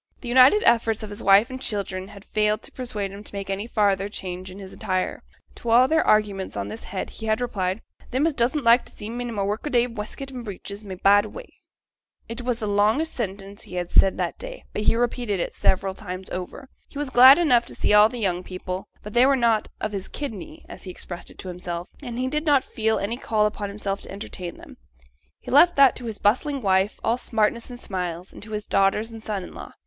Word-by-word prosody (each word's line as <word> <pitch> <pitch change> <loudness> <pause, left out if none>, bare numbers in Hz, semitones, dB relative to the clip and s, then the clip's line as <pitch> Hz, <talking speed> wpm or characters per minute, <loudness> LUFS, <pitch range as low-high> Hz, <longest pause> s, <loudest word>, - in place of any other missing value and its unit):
The 245 - -6
united 260 - +6
efforts 225 -2 +3
of 205 -1 -6
wife 200 +6 +5
and 260 0 -6
children 195 -4 -3
had 200 0 -13
failed 210 0 0
to - - -7
persuade 210 -6 -4
him 200 +1 -9
to 205 - -9
make 195 0 -4
any 200 +3 -3
farther 200 -3 +1
change 185 -2 -6
in 185 - -10
his 190 -1 -9
attire; 185 -4 -2 0.4
to 235 - -5
all 245 +3 +6
their 320 +3 +3
arguments 200 - +1
on 100 0 -3
this 110 +2 -8
head 190 - -5
he 220 - -7
had 220 0 +2
replied, 200 -5 -2 0.3
'Them 260 +5 +1
as 325 - +2
doesn't 260 +3 0
like 235 +1 +6
t' - - -14
see 210 +2 -7
me 245 +1 -4
i' - - -4
my 205 -4 -2
work 205 +2 -2
a - - -1
day 240 -3 +3
wescut 240 +4 -6
and 250 -2 -7
breeches 200 0 -7
may 195 -2 -7
bide 205 +2 +5
away.' - - -11 0.7
It 230 +2 -6
was 245 -1 -1
the 225 - -4
longest 215 +10 +2
sentence 200 -3 -5
he 180 - -5
said 190 - +4
that - - -2
day, - - -8
but - - -2
he 215 - +3
repeated 240 -4 -1
it - - -2
several 190 0 +1
times 185 -1 -8
over. 185 +9 -6 0.2
He - - -11
was 290 -2 -3
glad 260 +2 +9
enough 250 -9 +3
to - - -9
see - - +1
all 210 +1 +7
the 245 - -7
young 185 -5 0
people, 185 0 -6 0.2
but 210 - -8
they 245 +2 +5
were 275 - +4
not 230 -4 +2
'of 215 - -2
his 195 -2 -5
kidney,' 220 - -7
as - - -10
he - - -7
expressed 175 -1 -6
it - - -12
to - - -9
himself, 175 -1 -5
and 245 -4 -6
he 255 +1 -1
did 300 +4 -2
not 285 -3 +5
feel 220 0 0
any 215 +4 -2
call 215 -4 +1
upon 210 -1 -2
himself 200 -1 -4
to - - -8
entertain 190 -3 -6
them. - - -14 0.6
He - - -9
left 340 +6 +6
that 275 -2 +6
to 250 - -8
his 220 -3 -5
bustling 275 +7 +1
wife, 190 +1 +2
all 230 +2 +1
smartness 225 +1 0
and 245 -1 -9
smiles, 180 -4 -4
and - - -11
to 215 +1 -9
his 210 -1 -3
daughters 200 +3 +1
and 225 -1 -9
son 210 -4 -3
in - - -10
law. - - -9
210 Hz, 235 wpm, -24 LUFS, 195-245 Hz, 0.7 s, glad